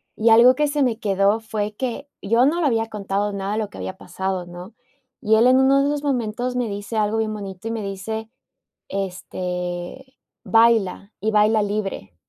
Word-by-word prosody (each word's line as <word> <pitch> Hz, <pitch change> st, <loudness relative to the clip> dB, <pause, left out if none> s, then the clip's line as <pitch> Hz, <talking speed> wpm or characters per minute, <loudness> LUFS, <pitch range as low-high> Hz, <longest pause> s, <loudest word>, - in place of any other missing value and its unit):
Y 225 Hz, +1 st, +2 dB
algo 240 Hz, +3 st, +7 dB
que 300 Hz, +1 st, +1 dB
se 290 Hz, 0 st, -1 dB
me 240 Hz, -4 st, +1 dB
quedó 200 Hz, 0 st, +2 dB
fue 215 Hz, -2 st, -4 dB
que, 265 Hz, +4 st, -4 dB
yo 230 Hz, +5 st, +3 dB
no 340 Hz, +4 st, +1 dB
le -, -, +1 dB
había 225 Hz, -3 st, +1 dB
contado 205 Hz, 0 st, -2 dB
nada 200 Hz, 0 st, -4 dB
de 220 Hz, -, -1 dB
lo 210 Hz, -2 st, -3 dB
que -, -, -13 dB
había 190 Hz, -, -6 dB
pasado, 190 Hz, 0 st, -4 dB
¿no?, 180 Hz, +5 st, -10 dB, 0.5 s
y 220 Hz, +1 st, +3 dB
él 230 Hz, +3 st, +5 dB
en 255 Hz, +1 st, +5 dB
uno 270 Hz, +1 st, +4 dB
de 280 Hz, -, +1 dB
esos 295 Hz, 0 st, -2 dB
momentos 250 Hz, -2 st, -1 dB
me 245 Hz, -3 st, -1 dB
dice 205 Hz, +3 st, -6 dB
algo 215 Hz, +1 st, +1 dB
bien 220 Hz, -1 st, -1 dB
bonito 195 Hz, 0 st, -7 dB
y -, -, -2 dB
me 225 Hz, -1 st, -3 dB
dice, 215 Hz, +3 st, -5 dB, 0.6 s
este: 180 Hz, +4 st, -5 dB, 0.3 s
"Baila 225 Hz, -3 st, +2 dB
y 220 Hz, +1 st, 0 dB
baila 215 Hz, +1 st, +4 dB
libre." 200 Hz, -, -4 dB
215 Hz, 195 wpm, -22 LUFS, 195-235 Hz, 0.6 s, algo